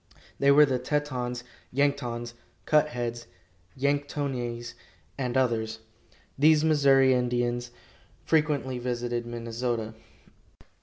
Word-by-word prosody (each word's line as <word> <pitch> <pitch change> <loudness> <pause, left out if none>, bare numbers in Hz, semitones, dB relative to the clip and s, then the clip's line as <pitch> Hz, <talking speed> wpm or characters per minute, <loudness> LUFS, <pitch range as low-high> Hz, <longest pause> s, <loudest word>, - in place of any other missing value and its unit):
They 140 - +4
were 145 +2 +8
the 130 -3 -1
Tetons, 125 -3 -2 0.3
Yanktons, 125 -4 -1 0.3
Cut 155 0 +4
heads, 120 -3 -4 0.5
Yanktonais, 135 -4 -2 0.4
and 130 -2 -2
others. 110 -3 0 0.6
These 155 +1 +5
Missouri 135 -4 +5
Indians 120 -1 0 0.6
frequently 145 -5 +1
visited 120 -1 -3
Minnesota. 115 -1 -3
125 Hz, 90 wpm, -27 LUFS, 120-140 Hz, 0.6 s, were